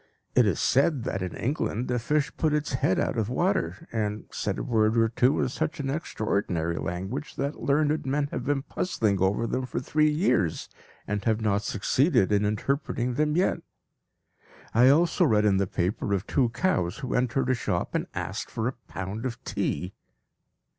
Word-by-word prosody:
It - - +5
is - - 0
said 135 0 +2
that 100 -6 -3
in 90 -1 -4
England 125 -2 -2
a 125 - +1
fish 150 +5 0
put 155 -2 +1
its 150 -2 -2
head 110 -6 +1
out 115 - 0
of 110 -1 -1
water 175 +3 -1
and 105 -2 -2
said - - -2
a - - -3
word 110 -1 +2
or 115 0 +4
two 125 +5 +2
in - - +2
such 150 +6 -3
an 135 -1 -2
extraordinary 100 - -1
language 95 +12 -4
that 140 +2 -3
learned 150 +2 +2
men 140 +2 +1
have - - -3
been 145 -2 0
puzzling 110 - -1
over 100 +5 +2
them 130 +2 -2
for - - -3
three 155 +4 +2
years, 150 - +1 0.4
and 105 -1 -2
have 110 -1 +2
not 105 -2 +1
succeeded 110 - +2
in 105 0 +3
interpreting 125 +3 -1
them 150 +3 +1
yet. 185 - +2 1.1
I 125 +3 +6
also 165 +5 +4
read 110 -9 +3
in 100 -2 +4
the 100 -1 +1
paper 95 +3 -1
of 95 - -3
two 125 -4 +2
cows 105 - 0
who 125 - -3
entered 130 +1 +1
a - - +4
shop 90 -7 -2
and - - -1
asked - - -4
for 110 +1 -2
a 130 - -1
pound 95 +4 -5
of 125 -3 -4
tea. 90 +6 -2
120 Hz, 185 wpm, -27 LUFS, 105-145 Hz, 1.1 s, I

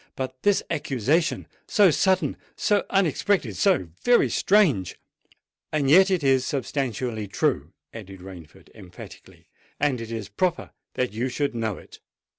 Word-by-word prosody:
But 130 -1 -6
this 205 -1 +2
accusation—so 160 - +1
sudden—so 190 +3 0
unexpected—so 150 - +1
very 245 0 +4
strange——" 165 - +2 0.8
"And 145 -3 +1
yet 190 +4 +7
it 185 -5 0
is 135 -2 +3
substantially 125 -5 -3
true," - - -1 0.2
added 95 -4 -10
Rainford 90 -4 -13
emphatically: 90 -1 -14 0.3
"and 135 -5 0
it 115 0 -7
is 110 -3 -5
proper 185 - -2 0.2
that 125 -4 -1
you 120 +4 -2
should 140 +2 -2
know 110 -4 -3
it. - - -15
130 Hz, 120 wpm, -24 LUFS, 110-175 Hz, 0.8 s, yet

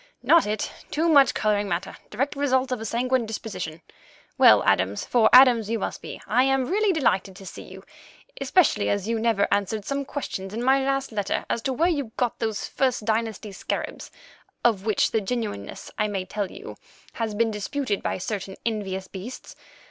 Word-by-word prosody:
"Not 335 -9 +5
it; 210 0 -2 0.2
too 320 +3 0
much 280 -4 +5
colouring 205 -1 +1
matter; - - -3
direct 270 +8 -2
result 260 -2 +1
of 250 -3 -2
a - - -5
sanguine 245 +1 0
disposition. 210 -7 -6 0.5
Well, - - +7
Adams—for 105 - +2
Adams 245 -4 +7
you 230 - 0
must 210 - -4
be—I 245 +3 -1
am 270 -1 +2
really 410 +6 +2
delighted 200 - +1
to 195 0 -12
see - - -8
you, - - -12 0.6
especially 285 +5 +3
as 200 0 -1
you 230 0 0
never 220 -3 +2
answered 205 +1 0
some 280 0 -2
questions 200 -9 -5
in 235 - -3
my 265 +1 +3
last 270 -1 -1
letter 205 -2 -2
as 230 - -1
to 265 +2 -1
where 330 +7 +2
you 285 -10 -2
got 245 -2 -1
those 220 -3 -2
First 255 -5 0
Dynasty 220 -1 -1
scarabs, 195 - -5 0.6
of 215 -3 +2
which 215 - +2
the 220 - +1
genuineness, 210 - -4
I 210 - +2
may 195 -3 -3
tell 205 0 -3
you, - - -10 0.4
has 225 -2 -3
been 225 +1 +1
disputed 210 +1 -2
by - - -2
certain 195 0 -4
envious 195 -4 -3
beasts. 200 +8 -9
225 Hz, 180 wpm, -25 LUFS, 205-260 Hz, 0.6 s, Well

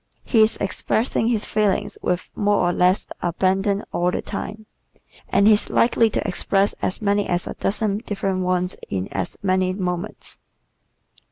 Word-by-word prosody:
He 225 - +3
is 215 +1 +3
expressing 220 +3 0
his 225 -3 +1
feelings 210 -3 0
with 180 0 -2
more 205 -1 +2
or - - 0
less 180 +2 +3 0.2
abandon 190 +3 +1
all 175 +1 +2
the - - -2
time 215 +1 -6 0.6
and 200 - +3
he 215 - +8
is 210 - +1
likely 230 -1 +3
to - - -2
express 195 +2 +1
as 190 - -2
many 205 0 +2
as 175 0 0
a - - -5
dozen 205 0 -1
different 195 -4 -2
ones 180 0 0
in 95 0 -2
as 95 -2 -4
many 185 -1 +2
moments. 180 0 -4
195 Hz, 160 wpm, -22 LUFS, 180-210 Hz, 0.6 s, he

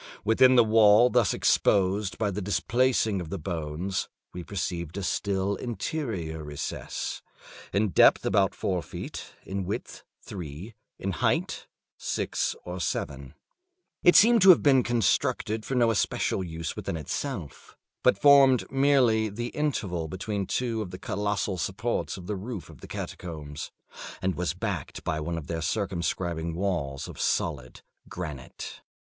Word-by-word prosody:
Within 130 +4 +5
the 120 - +7
wall 110 +2 +6
thus 120 -4 +3
exposed 100 +1 +2
by 105 -2 0
the 100 +2 -3
displacing 110 0 +1
of 85 - -7
the 100 - -3
bones, 85 +2 -3 0.2
we 90 - -6
perceived 85 -2 -4
a 100 - -3
still 100 +1 -1
interior 105 - -4
recess, 75 -1 -5 0.5
in 105 +1 +1
depth - - +5
about 95 -1 +2
four 90 -2 -1
feet, - - -8
in 95 0 -3
width 95 +3 -5 0.2
three, 90 +3 -8 0.2
in 95 - -3
height 85 - -1 0.3
six - - -1
or 90 +1 -5
seven. 70 -4 -3 0.7
It 175 - +6
seemed 230 +1 +7
to 190 - +7
have 180 - +8
been 135 -3 +6
constructed 115 -1 0
for 135 - -2
no 120 -2 +4
especial 100 -2 0
use 80 -2 -4
in 85 - -4
itself, 85 - -5 0.2
but - - +4
formed 135 -1 +6
merely 130 -5 +3
the 120 +4 -4
interval 100 - -2
between 95 +3 -3
two 115 -3 -1
of 100 - -5
the 90 - -7
colossal 100 -3 -2
supports 100 +8 -2
of 90 - -9
the 105 - -3
roof 105 0 -6
of - - -16
the - - -10
catacombs, 75 -3 -6 0.5
and 95 -1 0
was 90 0 -2
backed 90 -6 -4
by 80 - -1
one 85 +2 -3
of 80 - -6
their 80 +2 -3
circumscribing 85 -2 -2
walls 85 -8 -2
of - - -8
solid 65 -7 -1 0.3
granite. 75 -7 -7
95 Hz, 145 wpm, -27 LUFS, 85-115 Hz, 0.7 s, have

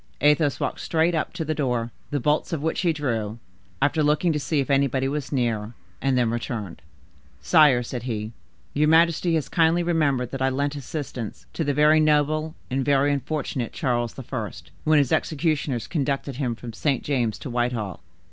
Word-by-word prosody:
Athos 150 0 +3
walked - - -2
straight 165 +1 +1
up 160 - -1
to 160 - -4
the 155 - 0
door, 125 -6 -1 0.2
the 145 - -1
bolts 150 +4 +1
of 155 -3 -2
which 160 - 0
he 175 -3 +3
drew, 115 -8 -2 0.5
after 155 +2 +2
looking 150 +3 +2
to 150 - -1
see 150 +1 0
if 140 +1 -1
anybody 135 -1 +2
was 145 0 -3
near, 115 -4 -1 0.3
and 135 -1 +2
then 120 -2 +2
returned. 115 -5 -4 0.6
"Sire," 150 -7 +5
said 120 +1 -5
he, 110 -3 -4 0.4
"your 150 +1 +2
majesty 165 +1 +4
has 155 - -1
kindly 170 0 +3
remembered 145 -8 +1
that 135 - -5
I 130 - +3
lent 140 +2 -1
assistance 135 -5 -6
to 165 - -1
the 145 -2 0
very 150 +2 +5
noble 155 +1 +2 0.2
and 135 +1 0
very 140 +1 +3
unfortunate 140 -4 -3
Charles 120 -3 -1
I., 125 -5 -4 0.4
when 155 0 +5
his 140 -3 +2
executioners 150 -5 0
conducted 140 -3 -2
him 125 -5 -1
from 115 0 -8
St. 135 +2 0
James's 120 -6 0
to 135 - -6
Whitehall." 120 -5 -2
140 Hz, 180 wpm, -24 LUFS, 125-155 Hz, 0.6 s, Sire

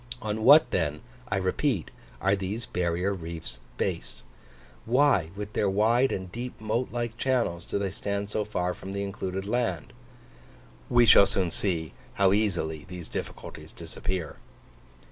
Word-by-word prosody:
On 110 0 -3
what 145 +1 +8
then, 75 -4 0 0.3
I 105 - +1
repeat, 95 - 0 0.3
are 100 +1 +3
these 100 +4 -4
barrier 90 0 0
reefs 85 -3 -5 0.2
based? - - -3 0.6
Why, 125 - +4
with 105 +1 -6
their 100 - +2
wide 115 +6 +3
and 95 -2 -4
deep 120 +4 -6
moat 115 +3 -1
like 120 -1 -3
channels, 120 -10 0
do - - -2
they 100 -2 -1
stand 100 +1 -3
so 105 - 0
far 90 -4 -1
from 95 +2 -8
the 100 0 -2
included 95 -1 -4
land? 120 +2 -1 1.0
We 120 -1 +6
shall 100 -2 +8
soon 90 -3 0
see 85 -4 -1 0.2
how 95 -1 +4
easily 85 -8 0
these 90 -2 -8
difficulties - - -7
disappear. 90 -3 -4
100 Hz, 145 wpm, -28 LUFS, 90-115 Hz, 1.0 s, what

